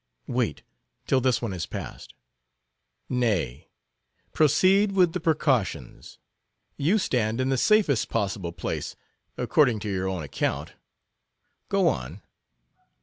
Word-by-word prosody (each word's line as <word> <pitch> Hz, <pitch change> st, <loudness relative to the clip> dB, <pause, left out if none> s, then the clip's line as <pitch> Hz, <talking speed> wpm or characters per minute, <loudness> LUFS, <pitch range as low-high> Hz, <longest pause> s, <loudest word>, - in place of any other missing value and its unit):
"Wait 120 Hz, -, -2 dB, 0.4 s
till 130 Hz, -, +2 dB
this 125 Hz, -1 st, +1 dB
one 110 Hz, -5 st, -2 dB
is 85 Hz, -4 st, -4 dB
passed." -, -, -8 dB, 0.9 s
"Nay, 90 Hz, -, -1 dB, 0.6 s
proceed 190 Hz, +7 st, +4 dB
with 180 Hz, -4 st, +3 dB
the 180 Hz, -, -2 dB
precautions. 135 Hz, -, -1 dB, 0.6 s
You 165 Hz, +10 st, +2 dB
stand 115 Hz, -, 0 dB
in 130 Hz, 0 st, +1 dB
the 135 Hz, -, +2 dB
safest 195 Hz, -, +3 dB
possible 100 Hz, -5 st, -2 dB
place 85 Hz, 0 st, -4 dB, 0.4 s
according 125 Hz, -7 st, +3 dB
to 105 Hz, -, -4 dB
your 95 Hz, 0 st, -1 dB
own 95 Hz, -4 st, -3 dB
account. 70 Hz, -, -3 dB, 1.0 s
Go -, -, +3 dB
on." 65 Hz, +10 st, -2 dB
120 Hz, 115 wpm, -26 LUFS, 95-150 Hz, 1.0 s, proceed